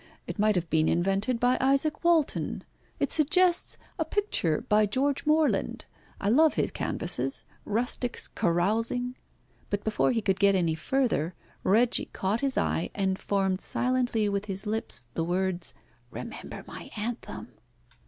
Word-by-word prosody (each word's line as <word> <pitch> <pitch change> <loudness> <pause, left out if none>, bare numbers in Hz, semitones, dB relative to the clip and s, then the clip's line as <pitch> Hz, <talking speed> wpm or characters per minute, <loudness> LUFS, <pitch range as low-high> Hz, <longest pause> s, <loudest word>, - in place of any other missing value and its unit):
It - - -6
might 215 0 +3
have 175 -1 0
been 160 0 +3
invented 195 +7 +1
by 250 +1 +3
Izaac 275 +4 +1
Walton. 335 -4 +1 0.4
It - - 0
suggests 345 +3 +3 0.2
a - - +3
picture 400 - 0
by 210 0 +4
George 275 +7 0
Morland. 310 0 +2 0.3
I 200 - -2
love 305 +8 +5
his - - 0
canvases, - - -1 0.2
rustics 240 +3 -1
carousing 225 +8 0 0.3
" - - -35
But 205 0 -2
before 220 +3 +2
he 225 -3 0
could 195 -1 +1
get 200 -1 +5
any 170 -4 +2
further, 180 - 0 0.3
Reggie 230 +5 +3
caught 200 +4 -1
his 275 -2 -1
eye 165 - 0
and 190 -1 0
formed 195 -2 0
silently 250 -4 +1
with 200 0 -1
his 195 -1 -4
lips 210 - -3
the 165 - -1
words, 180 +1 -1 0.3
"Remember - - -7
my - - -9
anthem." 230 +3 -5
215 Hz, 145 wpm, -28 LUFS, 190-255 Hz, 0.4 s, love